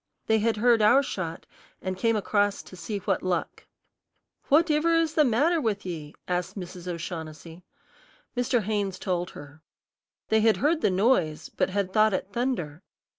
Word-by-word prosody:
They 220 0 +3
had 225 +1 +1
heard 235 0 +4
our 240 +7 +6
shot, 170 -9 -5 0.3
and 185 0 -3
came 230 +4 +1
across 205 -1 0
to - - -13
see 205 +3 -4
what 195 -1 -1
luck. 180 -2 -3 0.8
"What 315 +3 +4
iver 320 +3 +3
is 330 -2 +2
the 310 - +4
matter 295 +7 +2
with 210 -6 -1
ye?" 160 -4 -6
asked 180 +2 -2
Mrs. 180 -1 -8
O'Shaughnessy. 165 -1 -6 0.7
Mr. 245 -2 +1
Haynes 200 -2 -1
told 180 -2 -2
her. 145 +2 -12 0.7
They 220 0 +3
had 220 0 +4
heard 310 +3 +1
the - - +3
noise, 185 -6 +1
but - - -1
had 190 -1 -2
thought 215 -2 +4
it 190 - -4
thunder. 200 - -2
205 Hz, 165 wpm, -26 LUFS, 180-235 Hz, 0.8 s, our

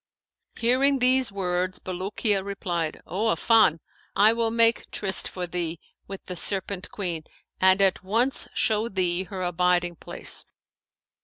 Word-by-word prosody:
Hearing 265 +4 +3
these 255 -2 +3
words 185 -1 -1
Bulukiya 195 +2 -1
replied, 175 -5 -3
'O 200 +5 -2
Affan, 220 -6 +4 0.4
I 215 +3 +6
will 230 -1 0
make 230 0 +2
tryst 195 -2 0
for 180 -1 -5
thee 170 -2 -3 0.3
with 195 -1 -8
the 180 - -6
Serpent 190 +1 -2
queen 175 -6 -3 0.4
and 190 +1 +5
at 190 -1 +1
once 230 +8 0
show 220 +1 +1
thee 185 -2 0
her 190 -1 -5
abiding 175 0 +1
place.' - - -3
190 Hz, 135 wpm, -25 LUFS, 180-225 Hz, 0.4 s, I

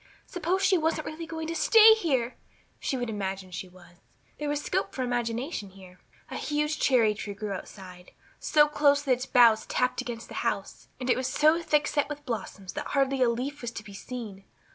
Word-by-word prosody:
Suppose 365 +2 -1
she 375 -3 +4
wasn't 315 -1 0
really 325 +1 -6
going 320 -1 -5
to 330 - -3
stay 445 +5 +7
here! 265 - 0 0.4
She 270 - -2
would 245 -1 -2
imagine 195 -3 -4
she 180 +1 -6
was. 175 -1 -18 0.4
There 295 -1 -2
was 290 0 0
scope 195 0 -2
for 260 - -1
imagination 240 - -2
here. 185 -1 -15 0.3
A - - -4
huge 300 +1 -1
cherry 230 -5 +4
tree 205 -1 -6
grew 210 0 -5
outside, 185 -2 -9 0.3
so 300 -1 +4
close 290 -1 +3
that 275 - -1
its 255 +1 +1
boughs 230 -3 +5
tapped 250 0 0
against 230 -1 -6
the - - -11
house, - - -3
and 255 - -4
it 250 - +4
was 255 0 -2
so 310 +3 +3
thick 300 -2 +2
set 290 -1 0
with 295 -1 -7
blossoms 200 -4 -5
that 295 0 -4
hardly 270 -1 +2
a 250 - +5
leaf 260 +5 -3
was 240 - -3
to 220 - -7
be 200 -1 -12
seen. 210 -2 -8
250 Hz, 205 wpm, -27 LUFS, 210-300 Hz, 0.4 s, stay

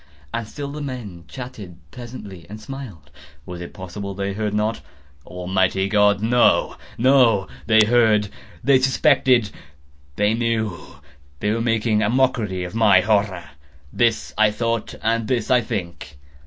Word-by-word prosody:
And 115 -2 -3
still 140 +3 -6
the 150 +1 -6
men 115 - -7
chatted 105 -3 -9
pleasantly, 105 -8 -10
and 105 +1 -8
smiled. 110 - -9 0.3
Was 90 -1 -8
it 85 - -8
possible 95 +2 -7
they 100 0 -3
heard 105 0 -2
not? 105 +2 -1 0.5
Almighty 95 +1 0
God!—no, 105 +3 +3 0.2
no! 120 -6 +4 0.2
They 110 -1 +6
heard!—they 115 +3 +2
suspected!—they 105 - 0
knew!—they 85 -9 -4
were 115 +1 -1
making 115 -2 +1
a 105 - +1
mockery 115 -7 0
of 90 - -7
my 105 -5 +5
horror!—this 90 - -2
I 110 -1 +5
thought, 115 +1 -2
and 115 0 0
this 120 -2 -1
I 125 -1 +5
think. 85 - -6
105 Hz, 125 wpm, -21 LUFS, 90-115 Hz, 0.5 s, They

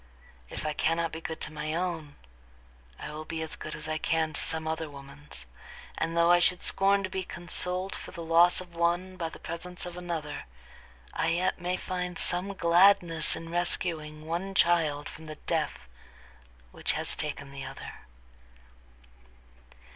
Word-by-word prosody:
If - - -4
I 155 - +1
cannot 165 +2 +1
be 160 - -6
good 160 -1 -4
to 150 - -1
my 155 +1 -2
own, 165 -4 -2 0.8
I 150 - -6
will 155 +1 -5
be 160 0 -3
as 160 - -2
good 155 - -4
as - - -5
I 155 0 0
can 160 -1 +1
to - - +2
some 160 0 +1
other 160 0 -2
woman's; 140 - -7 0.5
and 165 +1 -1
though 170 +1 +6
I 175 - +7
should 180 0 +2
scorn 195 +1 +4
to 190 - -2
be 190 0 -1
consoled 180 +2 -3
for - - -7
the 170 -2 -7
loss 170 +2 +5
of 180 -1 -10
one 175 +2 +1
by 170 -3 -2
the - - -10
presence 175 +2 -4
of 175 -1 -6
another, 170 -4 -4 0.7
I 165 - +1
yet 175 +2 +1
may 180 +1 0
find 180 -1 -3
some 190 +3 -1
gladness 170 -2 +5
in 165 0 -7
rescuing 160 -3 0
one 175 +4 -3
child 160 -5 +3
from 160 0 -10
the 155 - -6
death - - -2 0.8
which - - 0
has - - +2
taken 145 -2 -4
the 140 -1 -6
other." - - -7
165 Hz, 170 wpm, -29 LUFS, 155-180 Hz, 0.8 s, I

